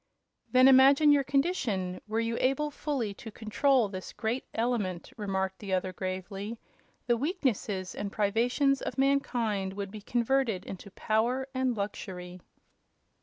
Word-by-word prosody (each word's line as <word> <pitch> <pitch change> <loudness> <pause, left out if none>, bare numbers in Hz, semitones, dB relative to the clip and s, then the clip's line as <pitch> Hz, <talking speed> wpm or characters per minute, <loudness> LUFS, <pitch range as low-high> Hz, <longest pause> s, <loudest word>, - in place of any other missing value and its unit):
"Then 255 0 +7
imagine 275 +3 +7
your 285 -1 +4
condition 255 - 0
were 220 +1 -1
you 230 0 -1
able 275 +3 +1
fully 270 -8 -2
to 225 - -10
control 235 +3 +2
this 185 -2 -7
great 235 +3 -2
element," 220 -7 -2
replied 190 -3 -1
the 195 -2 -4
other, 185 0 0
gravely. 195 +4 -5 0.5
"The 240 - +3
weaknesses 235 - -1
and 200 -1 -4
privations 240 +7 +1
of - - -4
mankind 240 -8 +1
would 200 -1 -5
be 215 0 -8
converted 235 -3 0
into 195 +1 -8
power 235 +6 0
and 260 -3 0
luxury." 185 -3 -5
225 Hz, 135 wpm, -29 LUFS, 195-265 Hz, 0.5 s, Then